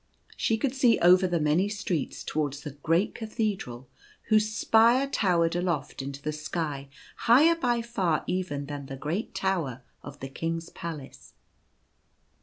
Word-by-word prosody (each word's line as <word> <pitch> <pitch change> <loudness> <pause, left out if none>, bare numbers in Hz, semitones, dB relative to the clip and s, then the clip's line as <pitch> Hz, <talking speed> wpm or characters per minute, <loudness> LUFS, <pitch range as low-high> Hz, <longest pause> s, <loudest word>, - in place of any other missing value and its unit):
She 225 - +1
could 260 +2 -1
see 250 -4 +4
over 180 +2 +5
the 175 -2 0
many 155 +6 +2
streets 195 -8 -3
towards 145 -2 -2
the 145 - -6
great 165 +7 0
cathedral 210 - -3 0.4
whose 215 0 +4
spire 230 +4 +4
towered 175 -11 +1
aloft 170 -7 -2
into 140 +1 -7
the 155 - -2
sky 150 -2 -4 0.4
higher 285 +8 +7
by 240 -7 0
far 190 -9 0
even 180 -6 -2
than 140 -1 -6
the 135 - -7
great 160 +10 -3
tower 160 -10 -1 0.2
of 145 - -10
the 135 - -6
king's 165 +4 -4
palace. 155 -5 -8
170 Hz, 145 wpm, -27 LUFS, 145-215 Hz, 0.4 s, higher